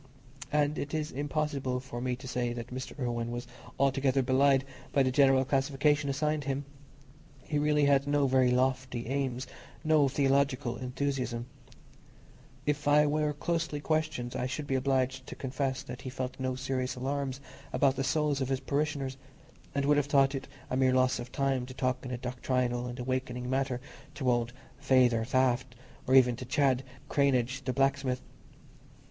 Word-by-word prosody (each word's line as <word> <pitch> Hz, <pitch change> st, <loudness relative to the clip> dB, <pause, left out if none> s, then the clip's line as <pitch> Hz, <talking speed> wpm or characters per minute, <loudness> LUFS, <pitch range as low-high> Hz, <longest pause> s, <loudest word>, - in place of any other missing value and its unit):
And 150 Hz, 0 st, +1 dB
it 145 Hz, +2 st, -3 dB
is 155 Hz, 0 st, -2 dB
impossible 140 Hz, -2 st, -1 dB
for 125 Hz, -2 st, -7 dB
me 125 Hz, 0 st, -1 dB
to 130 Hz, +1 st, -10 dB
say 120 Hz, -1 st, -1 dB
that 120 Hz, +1 st, -7 dB
Mr. 130 Hz, +1 st, -6 dB
Irwine 120 Hz, -2 st, -2 dB
was 120 Hz, +1 st, -4 dB, 0.3 s
altogether 135 Hz, 0 st, +2 dB
belied 135 Hz, +1 st, +3 dB, 0.3 s
by 140 Hz, -, +4 dB
the 130 Hz, -, +1 dB
generic 135 Hz, -1 st, +4 dB
classification 140 Hz, +1 st, +2 dB
assigned 150 Hz, +1 st, 0 dB
him. 140 Hz, 0 st, -2 dB, 0.8 s
He 150 Hz, -, -1 dB
really 150 Hz, 0 st, +3 dB
had 140 Hz, 0 st, +3 dB
no 145 Hz, 0 st, +3 dB
very 130 Hz, -1 st, +4 dB
lofty 130 Hz, -1 st, 0 dB
aims, 130 Hz, 0 st, -2 dB, 0.4 s
no 155 Hz, -3 st, +4 dB
theological 135 Hz, -2 st, +1 dB
enthusiasm: 125 Hz, -2 st, -2 dB, 1.2 s
if 145 Hz, 0 st, -1 dB
I 150 Hz, +1 st, +6 dB
were 150 Hz, 0 st, +1 dB
closely 155 Hz, 0 st, -2 dB
questioned, 155 Hz, -5 st, -1 dB
I 125 Hz, -, -1 dB
should 145 Hz, +3 st, -4 dB
be 135 Hz, -, -2 dB
obliged 130 Hz, 0 st, 0 dB
to -, -, -7 dB
confess 130 Hz, 0 st, -2 dB
that 125 Hz, -, -8 dB
he 130 Hz, -, -5 dB
felt 130 Hz, 0 st, -5 dB
no 130 Hz, -1 st, -1 dB
serious 130 Hz, -1 st, -2 dB
alarms 135 Hz, +1 st, -2 dB, 0.3 s
about 135 Hz, -2 st, +3 dB
the 135 Hz, -, -1 dB
souls 145 Hz, +1 st, +1 dB
of 130 Hz, -, -1 dB
his 135 Hz, -1 st, 0 dB
parishioners, 140 Hz, -2 st, -2 dB, 0.6 s
and 140 Hz, 0 st, +1 dB
would 145 Hz, +1 st, +4 dB
have 145 Hz, -1 st, +1 dB
thought 140 Hz, -1 st, +4 dB
it 135 Hz, -, -4 dB, 0.2 s
a -, -, +1 dB
mere 130 Hz, -1 st, +3 dB
loss 130 Hz, 0 st, +3 dB
of 120 Hz, +1 st, -7 dB
time 135 Hz, -3 st, 0 dB
to 130 Hz, -, -9 dB
talk 130 Hz, -1 st, -1 dB
in 130 Hz, -, -6 dB
a 125 Hz, -, -3 dB
doctrinal 125 Hz, 0 st, -1 dB
and 120 Hz, 0 st, -6 dB
awakening 125 Hz, -1 st, -3 dB
manner 130 Hz, -2 st, 0 dB, 0.4 s
to 130 Hz, -4 st, +1 dB
old 120 Hz, -1 st, 0 dB, 0.3 s
"Feyther 125 Hz, -5 st, +3 dB
Taft," 130 Hz, 0 st, +1 dB, 0.3 s
or 130 Hz, -, +4 dB
even 125 Hz, -2 st, +6 dB
to 125 Hz, -, -6 dB
Chad 135 Hz, 0 st, +2 dB, 0.2 s
Cranage 135 Hz, -2 st, +1 dB
the 130 Hz, -, 0 dB
blacksmith. 135 Hz, -1 st, +1 dB
135 Hz, 170 wpm, -30 LUFS, 125-140 Hz, 1.2 s, I